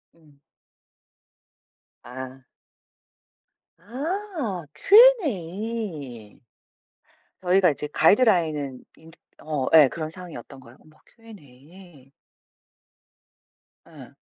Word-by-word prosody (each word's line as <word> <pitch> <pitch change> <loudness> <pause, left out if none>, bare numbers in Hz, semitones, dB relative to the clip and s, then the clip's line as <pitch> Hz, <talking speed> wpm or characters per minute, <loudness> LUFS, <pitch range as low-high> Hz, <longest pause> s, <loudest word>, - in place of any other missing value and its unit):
음. 150 -4 -25 1.6
아. 130 +2 -10 1.3
아. 275 - -5
Q&A. 205 - +1 1.0
저희가 185 -1 +2
이제 150 +1 -5
가이드라인은 160 - +1
인제 165 +1 -17 0.2
어 150 -4 -3
예. 155 -3 +8
그런 155 -2 -5
상황이었던 165 -5 -11
거예요. 130 -1 -17
어머. 155 0 -23
Q&A. 165 - -18 1.8
예. - - -15
165 Hz, 145 characters per minute, -24 LUFS, 140-215 Hz, 1.8 s, 예